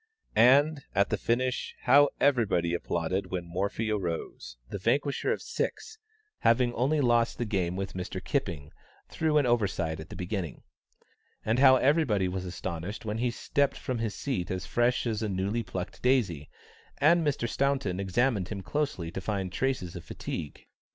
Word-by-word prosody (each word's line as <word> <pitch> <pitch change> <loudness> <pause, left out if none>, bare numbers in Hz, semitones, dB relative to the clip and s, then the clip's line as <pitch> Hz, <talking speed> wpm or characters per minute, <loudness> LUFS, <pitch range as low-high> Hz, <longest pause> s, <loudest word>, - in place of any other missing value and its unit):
And, 140 +5 +5
at 100 +1 +2
the - - +3
finish, 125 +2 -1
how 140 +3 +6
everybody 105 -11 +2
applauded 85 +2 -1
when 90 -2 -3
Morphy 100 +5 -2
arose, 85 - -4
the 100 - -5
vanquisher 140 +8 +1
of - - -2
six, 455 -1 -4 0.4
having 120 +1 +3
only 140 +6 +1
lost 120 -3 +2
the 120 - -1
game 95 -5 -1
with 95 0 -4
Mr. 90 -1 -4
Kipping 75 -3 -3 0.4
through 155 -1 +1
an 145 - +4
oversight 95 -9 0
at 80 - -9
the - - -8
beginning. 90 - -4 0.8
And 115 +3 +1
how 130 -1 +8
everybody 130 - +2
was 95 0 -3
astonished 90 +3 -5
when 105 +1 -2
he 125 +1 +1
stepped 140 +4 0
from 125 -2 -3
his 110 -3 -2
seat 115 -11 -2
as 95 -1 -3
fresh 120 +1 +1
as 110 -2 -1
a 110 - -1
newly 100 +4 -1
plucked 90 -2 -6
daisy, 105 - +1 0.5
and 165 +3 +4
Mr. 140 -5 0
Staunton 135 -8 0
examined 100 0 +1
him 100 -3 -5
closely 140 - -2
to 95 - -5
find 95 -2 -2
traces 100 -6 -2
of 85 - -7
fatigue. 75 - -6
110 Hz, 165 wpm, -29 LUFS, 90-130 Hz, 0.8 s, how